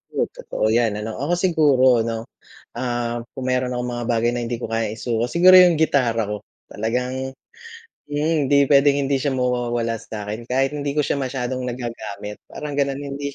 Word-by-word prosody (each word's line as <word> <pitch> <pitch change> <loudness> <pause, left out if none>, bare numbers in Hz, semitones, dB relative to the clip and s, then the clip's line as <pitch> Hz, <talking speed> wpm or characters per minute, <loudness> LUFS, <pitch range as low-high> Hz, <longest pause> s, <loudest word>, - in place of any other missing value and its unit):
Oh, - - +2
totoo - - -4
'yan 115 -2 +2
ano. 110 0 -5
Ako 145 +5 0
siguro 145 -9 +4
ano, 115 0 -2 0.6
ah, 120 -1 -2 0.2
kung 130 - -5
meron 125 -1 0
akong 125 0 -3
mga 120 0 -4
bagay 120 0 +1
na 120 - -2
hindi 120 - -2
ko 115 -1 -6
kayang 115 -1 -1
isuko, 115 0 -1
siguro 180 +7 +6
'yung 175 -2 +6
gitara 125 -7 +2
ko. 105 - -3 0.3
Talagang 125 +4 -3 0.8
mm, 145 +2 0 0.2
hindi 140 0 +4
puwedeng 140 0 +4
hindi 140 0 +1
siya 145 - +1
mawawala 120 -2 -1
sa'kin 105 +1 -6
kahit 135 +3 +1
hindi 145 0 -3
ko - - +5
siya - - 0
masyadong 130 -1 -3
nagagamit 115 -5 -6
parang 150 -1 -6
gano'n, 140 -1 0
hindi 140 0 -5
125 Hz, 175 wpm, -22 LUFS, 115-140 Hz, 0.8 s, siguro